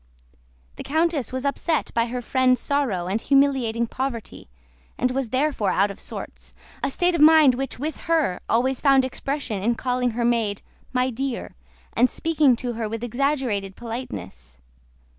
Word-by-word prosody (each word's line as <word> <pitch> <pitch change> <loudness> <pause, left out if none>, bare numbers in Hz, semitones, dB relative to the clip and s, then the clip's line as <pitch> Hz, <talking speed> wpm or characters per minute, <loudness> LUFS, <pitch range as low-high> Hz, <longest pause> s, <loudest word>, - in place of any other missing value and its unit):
The - - -6
countess 315 -3 0
was 260 +1 -4
upset 305 +2 0
by 230 0 +1
her 245 +1 -4
friend's 255 0 +2
sorrow 260 -12 0
and 200 +5 -1
humiliating 265 -5 +2
poverty, 240 - -5 0.5
and 250 +1 +1
was 260 -2 -2
therefore 260 -5 0
out 200 +2 +2
of 200 - -11
sorts, - - -9 0.3
a 275 - 0
state 355 +6 +1
of 335 - 0
mind 310 -3 +7
which 270 +2 -4
with 300 +4 -4
her 310 - +2
always 255 +3 +1
found 270 -2 +5
expression 260 -5 -3
in 235 +4 +1
calling 250 0 0
her 240 - +1
maid 225 -4 0 0.3
"my 255 0 +1
dear" 260 +1 -4 0.4
and 250 +2 +4
speaking 310 -6 +2
to 240 0 -4
her 225 -1 -3
with 225 +1 -5
exaggerated 240 -6 -1
politeness. 95 - -7
255 Hz, 160 wpm, -23 LUFS, 230-275 Hz, 0.5 s, mind